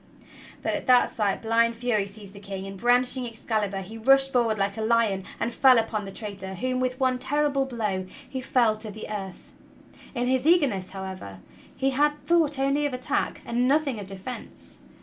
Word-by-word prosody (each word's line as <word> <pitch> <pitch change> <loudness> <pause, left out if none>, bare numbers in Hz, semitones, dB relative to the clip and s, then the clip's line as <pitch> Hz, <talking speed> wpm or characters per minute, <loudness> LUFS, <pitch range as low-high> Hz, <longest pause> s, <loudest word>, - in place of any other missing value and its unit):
But - - 0
at - - -4
that 250 -1 +5
sight 205 -1 -1
blind 230 +1 +2
fury 230 -4 0
seized 200 -1 -10
the 200 - -11
King, 195 -1 -6
and, 195 0 -7
brandishing 245 +3 +2
Excalibur, 215 -4 -2
he 220 +4 -9
rushed 270 +3 +4
forward 230 -3 +2
like 200 0 0
a 220 - -4
lion 220 -4 +1
and 235 - -1
fell 260 -1 +6
upon 220 -2 -1
the 195 - -7
traitor 195 -3 -5
whom, 255 +6 -1
with 255 0 -1
one 255 -1 +1
terrible 285 -1 0
blow, 210 -7 -2 0.2
he 260 0 -5
felled 240 -5 +2
to 215 0 -7
the 215 +1 -8
earth. 195 -3 -7 0.6
In 245 0 0
his 260 +2 +1
eager 340 -2 +6
ness, 190 -7 -3
however, 190 - -7 0.4
he 270 0 +1
had 295 +3 +3
thought 320 -4 +3
only 275 +2 +1
of 270 - -4
attack 250 - -2
and 240 +1 +1
nothing 280 -4 +1
of 200 - -7
defense. 195 +6 -8
230 Hz, 190 wpm, -26 LUFS, 200-260 Hz, 0.6 s, fell